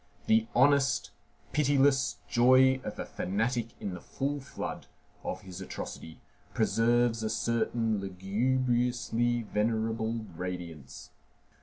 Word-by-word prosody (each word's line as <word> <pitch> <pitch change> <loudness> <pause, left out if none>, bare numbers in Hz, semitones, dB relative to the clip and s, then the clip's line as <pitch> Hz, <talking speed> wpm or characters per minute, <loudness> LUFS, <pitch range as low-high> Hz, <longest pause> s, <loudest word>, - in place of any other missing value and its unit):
The 225 0 +3
honest, 135 +1 +3 0.4
pitiless 140 -3 +3
joy 130 +6 +5
of 105 - -6
a - - -4
fanatic 115 +4 -2
in 100 - -4
the 90 - -7
full 145 +2 -3
flood 135 - -6 0.4
of - - -4
his 95 0 -9
atrocity 80 -3 -7 0.4
preserves 120 0 +2
a 110 - -1
certain 115 -1 0
lugubriously 120 +4 0
venerable 110 +1 -1
radiance. 85 -5 -7
115 Hz, 105 wpm, -30 LUFS, 105-130 Hz, 0.4 s, joy